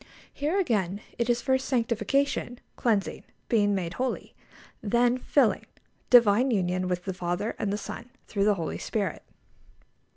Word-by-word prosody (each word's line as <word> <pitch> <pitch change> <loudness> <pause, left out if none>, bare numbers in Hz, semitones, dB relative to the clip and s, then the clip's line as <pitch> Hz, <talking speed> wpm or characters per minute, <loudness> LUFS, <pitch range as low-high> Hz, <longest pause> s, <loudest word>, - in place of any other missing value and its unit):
Here, 310 +7 0
again, 205 - 0 0.2
it 235 0 0
is 240 0 +1
first 265 -1 +1
sanctification 245 +1 0 0.2
(cleansing, 215 -5 0 0.3
being 205 -3 +3
made 175 -3 -3
holy), 255 +6 -3 0.5
then 240 +3 +2
filling, 255 -3 +2 0.4
divine 240 +1 +6
union 185 -4 0
with 180 -1 -2
the 190 - -2
Father 180 +4 -2
and 200 - -1
the 205 - -1
Son 215 - -7 0.2
through 200 -2 0
the 210 -1 +4
Holy 165 -4 -4
Spirit. 200 -7 -2
215 Hz, 140 wpm, -27 LUFS, 195-245 Hz, 0.5 s, divine